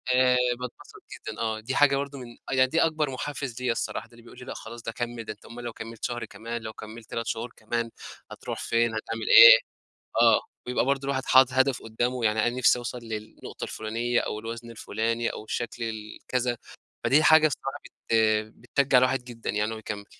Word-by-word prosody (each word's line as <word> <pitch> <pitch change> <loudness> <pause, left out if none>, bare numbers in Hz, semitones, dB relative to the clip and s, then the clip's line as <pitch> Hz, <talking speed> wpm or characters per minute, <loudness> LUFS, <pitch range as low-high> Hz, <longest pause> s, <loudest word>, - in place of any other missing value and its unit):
آآ، 125 0 +4 0.2
باتبسط 125 -1 -9
جدًا - - -8
آه، 110 -1 -1
دي 125 +5 -4
حاجة 140 -1 +5
برضو 140 0 -4
من 120 -2 -10
آه - - 0
يعني 130 0 +4
دي 165 +5 +2
أكبر 155 -3 +1
محفز 130 -2 -5
ليَّ 125 -2 +1
الصراحة، 115 - -3
ده - - -31
اللي 115 0 -16
بيقول 120 +1 -14
لي 125 - -10
لأ - - -6
خلاص 115 +1 -9
ده 115 - -4
كمّل، 120 0 -4
ده 110 - -5
أنت 105 - -22
أومال 120 +1 -9
لو 120 -1 -5
كمّلت 115 0 -9
شهر 120 -1 -3
كمان 115 +2 -6
لو 110 0 -7
كمّلت 110 0 -11
3 115 0 -4
شهور 115 +1 -3
كمان 115 +1 -3 0.4
هتروح - - -6
فين، 115 -1 +1
هتعمل 115 +1 -4
إيه، - - +11 0.6
آه - - +6 0.2
بيبقى 125 0 0
برضو 135 0 0
الواحد 135 -1 -1
حاطط 130 0 +6
هدف 130 0 +2
قدامه، 120 +2 -1
يعني 110 +1 +2
أنا 120 +1 -2
نِفسي 125 0 +4
أوصل 120 +1 -5
للنقطة 110 -2 -8
الفلانية 115 +2 -1
أو 105 - -3
الوزن 115 +1 -7
الفلاني 115 +1 -2
أو - - -7
الشكل 120 +1 -4
ال 110 -2 -6
كذا، 125 -1 0 0.5
فدي 150 +3 +4
حاجة 155 0 +7
بصراحة 135 -2 -5
بت 115 - -4 0.5
بتشجع 140 -2 +3
الواحد 130 0 +3
جدًا 120 -2 -8
يعني 105 +1 +1
إن 115 - -4
هو - - -6
يكمّل. 105 -1 -6
120 Hz, 210 wpm, -26 LUFS, 115-130 Hz, 0.6 s, إيه